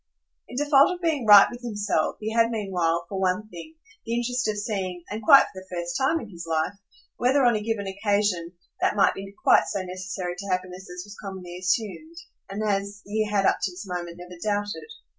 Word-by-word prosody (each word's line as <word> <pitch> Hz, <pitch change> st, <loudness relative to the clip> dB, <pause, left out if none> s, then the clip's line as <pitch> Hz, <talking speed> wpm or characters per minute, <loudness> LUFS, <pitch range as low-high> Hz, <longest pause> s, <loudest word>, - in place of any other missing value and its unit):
In -, -, -10 dB
default 290 Hz, +2 st, +5 dB
of -, -, -12 dB
being 315 Hz, -9 st, 0 dB
right 205 Hz, -1 st, +10 dB
with 245 Hz, -, -9 dB
himself 205 Hz, -8 st, -1 dB
he 220 Hz, +1 st, -3 dB
had 230 Hz, 0 st, +4 dB
meanwhile, 180 Hz, -7 st, -1 dB
for 195 Hz, -, -4 dB
one 190 Hz, +3 st, 0 dB
thing, 165 Hz, -3 st, -10 dB, 0.3 s
the 230 Hz, -, -2 dB
interest 245 Hz, 0 st, -1 dB
of 215 Hz, -1 st, -1 dB
seeing 190 Hz, -4 st, -3 dB
and 215 Hz, +2 st, -4 dB
quite 275 Hz, +2 st, +8 dB
for -, -, -9 dB
the 190 Hz, -, -17 dB
first 175 Hz, -1 st, -3 dB
time 275 Hz, +5 st, +2 dB
in 230 Hz, -, -8 dB
his 170 Hz, -1 st, -8 dB
life 160 Hz, +3 st, 0 dB, 0.4 s
whether, 265 Hz, +3 st, +3 dB
on 240 Hz, -2 st, +4 dB
a 210 Hz, -, -1 dB
given 215 Hz, -2 st, -2 dB
occasion, 195 Hz, -3 st, 0 dB, 0.3 s
that -, -, +1 dB
might 200 Hz, -, +4 dB
be 195 Hz, 0 st, -8 dB
quite -, -, +6 dB
so 195 Hz, -2 st, -2 dB
necessary 185 Hz, 0 st, -5 dB
to 200 Hz, -, -6 dB
happiness 185 Hz, 0 st, -3 dB
as 180 Hz, 0 st, -7 dB
was 205 Hz, 0 st, -11 dB
commonly 190 Hz, -3 st, -7 dB
assumed 215 Hz, -, -2 dB, 0.3 s
and 210 Hz, +2 st, -3 dB
as 200 Hz, 0 st, -2 dB
he 215 Hz, +1 st, -1 dB
had 205 Hz, -2 st, +1 dB
up -, -, +3 dB
to -, -, 0 dB
this 180 Hz, +4 st, -9 dB
moment 175 Hz, -1 st, -5 dB
never 180 Hz, 0 st, -11 dB
doubted. 205 Hz, -, -2 dB
200 Hz, 210 wpm, -25 LUFS, 180-225 Hz, 0.4 s, right